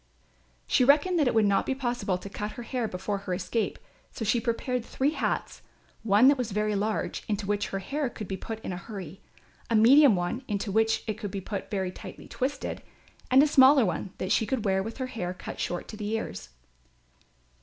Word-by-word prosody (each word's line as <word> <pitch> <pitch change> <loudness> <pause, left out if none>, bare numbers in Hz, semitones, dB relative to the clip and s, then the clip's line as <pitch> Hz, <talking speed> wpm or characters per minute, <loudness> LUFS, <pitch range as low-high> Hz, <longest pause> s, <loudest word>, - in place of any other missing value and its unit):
She 255 - +3
reckoned 300 +7 +4
that 295 - +3
it 245 - +1
would 220 -1 +5
not 200 -1 +3
be 265 - 0
possible 240 -8 -1
to 185 - -9
cut 210 +1 -5
her 240 - -7
hair 240 -1 -2
before 195 +1 -3
her 185 -2 -3
escape; 190 +5 -2 0.3
so 225 - -5
she 225 +3 +2
prepared 240 +1 -1
three 270 +4 0
hats, - - -2 0.4
one 220 +3 +5
that 280 -1 +5
was 230 -5 -2
very 210 +1 0
large 210 +2 -2
into 205 -1 -2
which 205 0 0
her 195 - -3
hair 275 +8 -2
could 215 -4 -8
be 190 - -3
put 220 +3 -6
in 190 - -4
a - - -4
hurry, 190 -2 -8 0.5
a 230 - +2
medium 250 +2 +7
one 180 +9 -2
into 205 -1 -2
which 220 +2 +2
it 215 -1 -4
could 205 - -4
be 195 +1 -4
put 195 +1 -5
if - - -26
very 190 -3 -2
tightly - - -10
twisted, 270 +2 -3 0.5
and 265 +2 +7
a - - +4
smaller 270 -2 +6
one, 180 +1 -2
that 185 - -3
she 220 - +2
could 230 -1 -1
wear 190 -1 +2
with 225 +3 -6
her 260 - -2
hair 185 -8 -4
cut - - -8
short 175 - -3
to 215 - -8
the 205 -1 -4
ears. 90 - -4
215 Hz, 220 wpm, -28 LUFS, 195-250 Hz, 0.5 s, medium